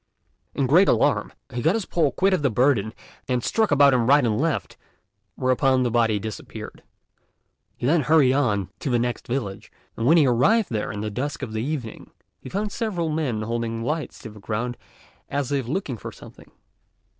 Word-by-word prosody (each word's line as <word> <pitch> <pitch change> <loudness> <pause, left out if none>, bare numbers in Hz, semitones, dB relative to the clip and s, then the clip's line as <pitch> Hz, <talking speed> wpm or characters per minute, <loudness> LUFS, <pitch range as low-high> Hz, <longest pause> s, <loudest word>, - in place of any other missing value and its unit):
In 140 - +1
great 170 +9 +5
alarm, 145 - +2 0.2
he 120 - -2
got 160 - +2
his 220 -4 -2
pole 155 -5 +1
quit 195 +1 +2
of 185 - +1
the 140 - +2
burden 115 -3 +2 0.4
and 125 -2 0
struck 220 -1 +1
about 140 -1 +5
him 120 -2 +2
right 140 0 +5
and 110 +2 0
left, 165 -1 -1 0.6
whereupon 130 0 +2
the 120 - 0
body 115 -2 +2
disappeared. 110 +1 -8 1.0
He - - -4
then 155 +5 +3
hurried 145 -2 +4
on 105 -10 0
to - - -3
the 120 - +2
next 120 0 -2
village, 120 -6 -4 0.2
and 115 - -1
when 165 +4 +6
he 155 - +5
arrived 185 - +3
there 105 -2 -2
in 105 -1 -5
the 105 0 -3
dusk 140 +7 -4
of 110 - -5
the 110 - -2
evening, 130 -4 -5 0.3
he - - -10
found 205 +2 -2
several 195 -9 -2
men 140 -9 -1
holding 115 0 -3
lights 155 +4 -3
to 110 - -8
the 105 - -13
ground 115 +4 -3 0.5
as 140 -1 -2
if 135 -4 -1
looking 145 -4 -3
for - - -8
something. - - -15
130 Hz, 190 wpm, -24 LUFS, 115-150 Hz, 1.0 s, when